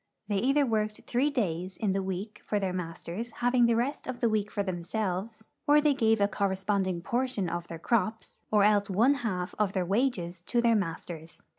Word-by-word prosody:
They 205 - +1
either 275 +7 +3
Avorked 215 -3 -1
three 255 +4 +1
days 185 - -2
in 205 -4 0
the 195 - 0
week 190 +3 -5
for 210 - +1
their 190 -2 -1
masters, 180 +5 -5
having 245 0 +3
the 235 - +3
rest 250 +5 -1
of 255 -2 -4
the - - +1
Aveek 215 -2 +1
for 200 - -2
them 185 -3 -3
selves, 215 +3 -3 0.2
or 295 +1 +7
they 295 -1 +3
gaA^e 225 -4 +2
a 200 - +4
corresponding 190 -3 -1
portion 245 -5 -1
of 175 0 -4
their 165 - -6
crops, 220 +4 -1
or 210 -2 +4
else 205 -1 +3
one 225 +9 +4
half 180 -6 -2
of 205 -2 +1
their 185 -2 0
Avages 185 -5 0
to 240 - +1
their 235 -1 +4
masters. 165 -3 -4
205 Hz, 200 wpm, -29 LUFS, 185-235 Hz, 0.2 s, or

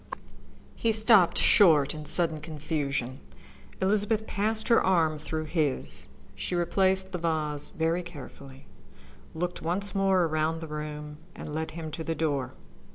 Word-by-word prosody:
He 230 - 0
stopped 215 -4 +6
short 155 -8 +5
in 155 -1 -8
sudden 160 -2 +1
confusion. 145 -4 -3 0.6
Elizabeth 210 +3 +1
passed 220 +2 -2
her 230 - +5
arm 165 -5 +2
through 155 +1 -4
his. 140 - -2 0.3
She - - -4
replaced 190 +2 +1
the 180 - -4
vase 155 -3 -2
very 165 +2 -1
carefully, 140 -5 -12 0.7
looked 180 +2 -3
once 190 +5 -2
more 195 -2 +2
around 160 0 -1
the 160 - -7
room, 150 0 -7 0.2
and 150 - -8
led 160 +1 -3
him 160 -2 -6
to 160 - -5
the 165 0 -3
door. 145 -4 -2
160 Hz, 140 wpm, -27 LUFS, 150-190 Hz, 0.7 s, stopped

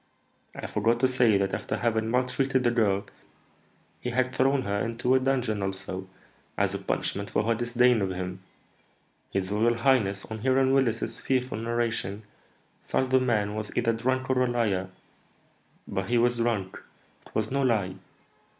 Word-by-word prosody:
I - - -6
forgot 115 +3 +1
to 130 - +5
say 125 -5 +3
that, 95 0 -1
after 95 - -2
having 110 -2 0
maltreated 130 +2 +1
the 120 - +3
girl, 100 -4 +1 0.9
he 125 - -4
had 130 +1 0
thrown 135 +1 +2
her 100 0 -1
into 115 +2 0
a 130 - +5
dungeon 125 -5 0
also, 95 -1 -4 0.5
as - - +1
a - - -3
punishment 100 0 -2
for - - +1
her 115 +2 +2
disdain 120 0 +3
of 95 - 0
him. 90 0 -4 0.9
His 95 0 -2
royal 115 +3 +2
highness, 115 -6 +2
on 110 0 -6
hearing 130 +2 +3
Willis's 115 -4 0
fearful 130 -3 -1
narration, 115 -3 -2 0.6
thought 130 0 -1
the 130 - +5
man 105 -5 +1
was 110 -1 -4
either 115 -1 +2
drunk 130 +3 -1
or 130 -1 +2
a - - +1
liar; 105 -6 0 1.0
but 95 0 -3
he 120 - +3
was 120 +1 +3
drunk, 115 -5 -1 0.5
it - - -23
was 110 +1 -1
no 140 +1 +1
lie. 110 -8 +1
115 Hz, 165 wpm, -27 LUFS, 100-125 Hz, 1.0 s, to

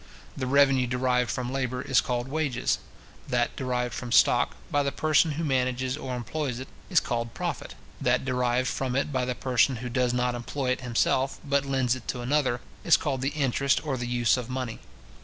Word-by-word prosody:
The 130 -2 -3
revenue 135 -2 +4
derived 125 0 +1
from 125 0 -2
labour 130 -1 -2
is 130 - +3
called 120 -1 -2
wages; 140 -4 0 0.5
that - - 0
derived 125 -2 -2
from 120 0 -5
stock, - - +4 0.2
by 145 - +3
the 140 0 0
person 155 +2 +2
who 165 +3 -3
manages 130 -2 0
or 130 -4 -5
employs 125 +1 -3
it, 130 - -7 0.2
is 175 -5 +5
called 115 -1 -3
profit; - - -4 0.3
that - - +2
derived 125 -1 +1
from 130 -1 -2
it 140 +2 0
by 130 -1 +1
the 125 0 -2
person 130 +1 +2
who 125 +1 -5
does 125 0 +1
not 125 0 0
employ 125 +2 -2
it 130 - -1
himself, 130 +2 +1
but 140 -1 +1
lends 130 -2 +1
it 130 - -11
to 125 - -3
another, 130 -1 +1 0.2
is 170 - +6
called 135 -4 -2
the 135 - +1
interest 140 +1 +1
or 140 -3 -1
the 125 -1 -4
use 120 0 +2
of 125 -1 -5
money. 125 -3 -4
130 Hz, 195 wpm, -27 LUFS, 125-135 Hz, 0.5 s, is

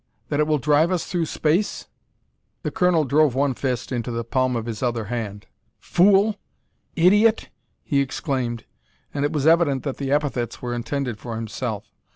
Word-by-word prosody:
that 145 - 0
it 150 - +3
will 155 -1 +2
drive 150 +4 +3
us 180 -3 0
through 170 -3 -1
space?" 165 +9 0 0.8
The - - -2
colonel 180 -4 +2
drove 145 -1 +3
one 140 0 +2
fist 125 -1 -3
into 120 -1 -2
the 115 0 -2
palm 130 +2 0
of 115 -1 -2
his 115 -2 -5
other 120 -3 -1
hand. 105 -4 -4 0.3
"Fool! 200 +3 +3 0.6
Idiot!" 210 +6 +4 0.3
he 140 - +1
exclaimed, 130 -4 -2 0.5
and 140 - -1
it 145 - +1
was 150 -3 -1
evident 160 -5 +4
that 140 -3 -3
the 135 -1 -3
epithets 140 -5 -1
were 120 -1 -4
intended 120 -1 -3
for 115 -2 -6
himself. 110 -1 -5
140 Hz, 170 wpm, -23 LUFS, 120-155 Hz, 0.8 s, Idiot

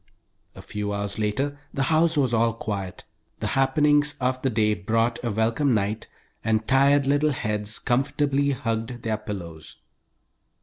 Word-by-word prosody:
A - - -11
few 105 0 -4
hours 100 0 -3
later 135 +8 -1
the 135 - -1
house 160 0 +3
was 130 -4 +2
all 115 0 +2
quiet. 100 -5 -5 0.4
The - - -3
happenings 145 +2 +3
of 130 0 0
the 135 - +1
day 105 -2 +2
brought 115 +4 0
a 120 - -1
welcome 115 +5 +1
night, 105 +1 -1 0.4
and 110 0 0
tired 140 +1 +4
little 145 +2 +2
heads 105 -5 -2
comfortably 140 +2 +1
hugged 120 -3 -3
their 110 -1 -1
pillows. 85 -7 -8
115 Hz, 145 wpm, -25 LUFS, 105-140 Hz, 0.4 s, tired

